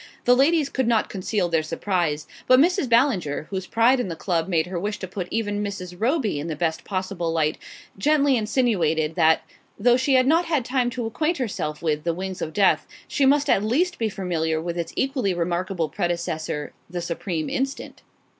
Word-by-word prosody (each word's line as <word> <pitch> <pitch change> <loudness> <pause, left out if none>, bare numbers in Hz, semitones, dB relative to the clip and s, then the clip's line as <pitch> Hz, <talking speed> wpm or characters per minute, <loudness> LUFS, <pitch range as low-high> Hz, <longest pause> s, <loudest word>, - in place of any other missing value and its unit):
The 245 - +6
ladies 295 +3 +3
could 260 -3 -1
not 230 -2 +1
conceal 195 -1 -1
their 165 -2 +1
surprise; 155 -2 -1 0.2
but 255 0 +7
Mrs. 345 -2 +2
Ballinger, 230 - +2
whose 190 -1 -3
pride 235 +3 +3
in 245 - -1
the 170 - -4
club 170 -1 -1
made 165 -4 +1
her 180 -1 -4
wish 205 +3 -3
to 190 - -6
put 180 -1 -5
even 205 -2 -1
Mrs. 185 -3 -5
Roby 225 - 0
in 150 - -4
the 160 - -3
best 160 +1 -1
possible 185 -3 -3
light, 155 -2 0 0.4
gently 285 +2 +3
insinuated 200 - +1
that, 160 0 +3 0.3
though 240 +3 +4
she 260 +1 +2
had 255 0 +5
not 325 +5 +3
had 305 -8 0
time 250 -1 +1
to 245 -1 -4
acquaint 305 +9 -1
herself 180 - -3
with 150 -2 0
"The 170 0 -1
Wings 190 +1 -5
of 155 - -3
Death," 195 +2 +2 0.2
she 275 -3 +2
must 290 +1 +3
at 200 -7 +3
least 335 +12 +1
be 225 -1 0
familiar 165 -5 -1
with 170 +1 -4
its 170 -1 -3
equally 260 -9 0
remarkable 175 0 -1
predecessor, 160 -3 -3 0.2
"The 175 0 -4
Supreme 170 -1 -3
Instant." 270 +1 -3
195 Hz, 190 wpm, -24 LUFS, 170-255 Hz, 0.4 s, but